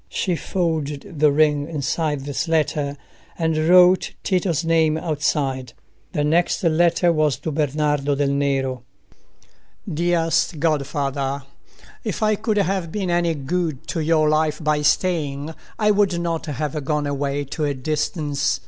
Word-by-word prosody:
She 180 -3 -1
folded 155 -4 -3
the 150 -1 +5
ring 150 0 +2
inside 150 0 -1
this 145 +4 -3
letter, 150 -3 0 0.4
and 160 -1 0
wrote 180 +3 +5
Tito's 180 -4 0
name 160 -1 +3
outside. 140 -6 -1 0.4
The 150 -4 0
next 170 +7 +1
letter 170 +1 +3
was 155 -5 +1
to 155 +3 -4
Bernardo 145 -1 0
del 140 0 +1
Nero:— 135 -2 0 1.1
"Dearest 165 0 +1
Godfather,—If 140 - -3
I 215 0 +3
could 215 0 -1
have 190 -3 0
been 190 -2 -2
any 170 -1 +1
good 155 0 -2
to 170 - -2
your 155 -1 +2
life 155 0 +1
by 150 -1 +1
staying 150 -2 0 0.2
I 210 -1 +3
would 200 -4 +2
not 170 -1 -2
have 150 0 -3
gone 150 +1 -1
away 140 0 -2
to 145 +2 -3
a 145 -1 -1
distance. 145 +1 -1
155 Hz, 135 wpm, -22 LUFS, 145-170 Hz, 1.1 s, the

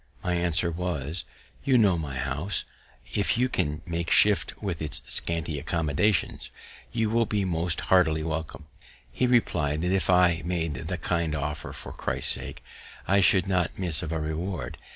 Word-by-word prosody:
My 90 - 0
answer 85 0 +1
was, 85 -2 -3 0.4
"You 130 -2 +4
know 100 -6 +4
my 75 -5 -4
house; 70 +8 -2 0.5
if 100 +2 +1
you 125 +1 +3
can 75 -11 -2
make 85 0 -3
shift 105 -1 +3
with 95 -6 -4
its 75 -5 +2
scanty 80 +3 +1
accommodations, 80 +5 0 0.4
you 110 -1 0
will 115 0 +2
be 105 -2 0
most 85 -1 -1
heartily 80 -4 +3
welcome." 80 -1 -4 0.5
He 125 - +1
reply'd, 80 -11 +1
that 90 - 0
if 95 -4 0
I 90 -2 +4
made 85 -3 -2
that 65 - -5
kind 85 -3 0
offer 75 0 -4
for - - -9
Christ's - - -1
sake, - - -5 0.4
I 100 +1 +4
should 95 +1 +5
not 90 -3 0
miss 85 -5 +1
of 80 - -5
a 80 - -1
reward. 80 +3 -4
85 Hz, 165 wpm, -27 LUFS, 80-95 Hz, 0.5 s, should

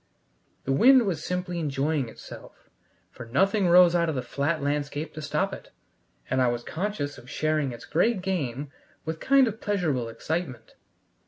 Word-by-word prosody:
The 135 - -2
wind 250 - +6
was 165 -6 -2
simply 180 -1 -3
enjoying 145 -3 -1
itself, - - -13 0.4
for 120 - -10
nothing 195 - +2
rose 175 0 +7
out 170 -1 +2
of 155 - -2
the 130 - -2
flat 155 +3 -1
landscape 145 +1 -2
to 155 - -7
stop - - -1
it, - - -9 0.6
and 130 +1 +1
I 125 - +4
was 120 0 -1
conscious 165 -4 -4
of 125 - -15
sharing 155 -2 0
its 120 0 -9
great 185 +4 +1
game 145 -7 -3 0.3
with 160 0 -3
a - - -25
kind 275 -1 +4
of 220 0 -5
pleasurable 155 - -1
excitement. 160 +2 -4
155 Hz, 170 wpm, -26 LUFS, 135-180 Hz, 0.6 s, rose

